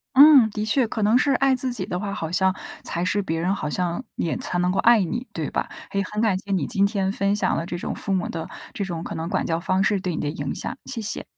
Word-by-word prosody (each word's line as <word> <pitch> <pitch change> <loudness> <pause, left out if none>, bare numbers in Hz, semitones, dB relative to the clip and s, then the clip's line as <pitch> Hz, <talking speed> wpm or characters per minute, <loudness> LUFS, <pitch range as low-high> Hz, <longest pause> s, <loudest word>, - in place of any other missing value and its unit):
嗯， 275 -4 +9
的 210 0 -3
确。 235 +3 +2
可 220 - -3
能 215 +4 +4
是 280 +1 +2
爱 270 0 +3
自 255 0 -1
己 200 -6 -3
的 180 - -3
话， 200 -1 -3
好 160 -3 -4
像 190 +1 +2 0.3
才 170 +1 -3
是 200 +2 +1
别 165 -3 -2
人 185 +4 +1
好 150 - -3
像 180 +5 -1
也 165 - -1
才 180 - -1
能 180 0 +2
够 - - -1
爱 235 -3 +5
你， 240 +9 -4
对 - - -3
吧？ - - -2 0.2
哎， 200 - -2
也 - - +2
很 210 - -1
感 210 -5 +2
谢 200 - -12
你 190 - +1
今 200 -4 +1
天 195 -2 -1
分 200 0 +1
享 - - +1
了 165 - -2
这 175 - -4
种 - - -4
父 195 - -3
母 185 -2 0
的 165 -1 -5 0.2
这 200 - -3
种， 170 -3 -4
可 - - -5
能 165 +1 -4
管 - - 0
教 165 0 -1
方 185 +1 +1
式 200 0 +2
对 180 -2 -2
你 - - -3
的 145 - -1
影 170 - -4
响， - - -4
谢 250 -4 -3
谢。 215 - -2
195 Hz, 305 characters per minute, -23 LUFS, 180-220 Hz, 0.3 s, 嗯